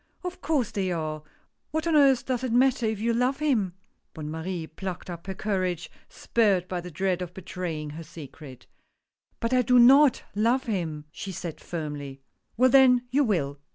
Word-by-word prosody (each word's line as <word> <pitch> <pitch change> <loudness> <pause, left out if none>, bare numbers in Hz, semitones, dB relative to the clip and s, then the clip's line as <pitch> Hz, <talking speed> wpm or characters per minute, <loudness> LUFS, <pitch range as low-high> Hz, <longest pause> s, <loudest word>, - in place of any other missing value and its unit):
" - - -40
Of 360 0 -6
course 285 -8 0
they 190 -2 -1
are 155 -2 -3 0.2
— - - -49
what 315 +2 -2
on 330 -2 +2
earth 275 -4 +5
does 255 -1 -2
it 255 - -1
matter, 245 -1 +3
if 215 -2 -2
you 230 +2 +1
love 250 +3 +1
him? 230 -12 0 0.2
" - - -49
Bonne 155 -2 -6
Marie 165 +1 -4
plucked 180 +3 -7
up 170 +2 -9
her 190 - -4
courage, 185 -4 -2 0.2
spurred 200 -6 +1
by 180 -1 -3
the 180 - -8
dread 185 +2 -1
of 180 -1 -6
betraying 170 -5 -5
her 160 +3 -8
secret. 150 -4 -11 0.4
" - - -48
But 230 +2 0
I 255 - +5
do 250 +1 +3
not 270 +3 +6
love 235 +5 +2
him," 165 -9 -3
she 195 - -6
said 170 -3 -6
firmly. 145 -5 -6 0.4
"Well 255 +1 +5
then, 255 -2 +6
you 285 +3 +3
will. 145 - -1
190 Hz, 195 wpm, -26 LUFS, 165-250 Hz, 0.4 s, not